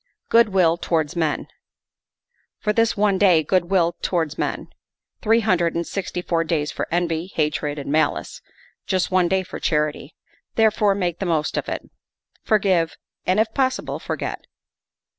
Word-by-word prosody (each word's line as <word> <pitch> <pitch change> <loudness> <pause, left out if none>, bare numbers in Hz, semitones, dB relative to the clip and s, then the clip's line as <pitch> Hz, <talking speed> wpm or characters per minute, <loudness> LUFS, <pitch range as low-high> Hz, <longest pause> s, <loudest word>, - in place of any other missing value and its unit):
" - - -54
Good 230 -1 +5
will 175 -4 +3
towards 165 -1 -1
men." 160 -3 0 1.1
For 210 - -1
this 230 0 +2
one 200 -2 +2
day 180 -6 +5
good 175 +2 +1
will 175 -3 +2
towards 160 -4 -1
men. - - -3 0.5
Three 225 +1 +3
hundred 175 -6 +1
and 170 0 -1
sixty 180 -1 -4
four 165 -2 +1
days 155 -3 -1
for - - -4
envy, 170 +1 -1
hatred, 150 -1 -1
and 140 -1 -5
malice; 155 0 0 0.5
just 185 -1 0
one 185 -2 +3
for 185 - -8
charity. 150 -1 -1 0.4
Therefore 215 -2 +3
make 175 -3 -2
the 195 - -2
most 155 -3 0
of - - -2
it; - - -3 0.6
forgive, 190 -6 +1 0.3
and, 185 +3 +3
if 220 0 +1
possible, 260 -1 -1
forget. - - -5
175 Hz, 155 wpm, -22 LUFS, 160-200 Hz, 1.1 s, Good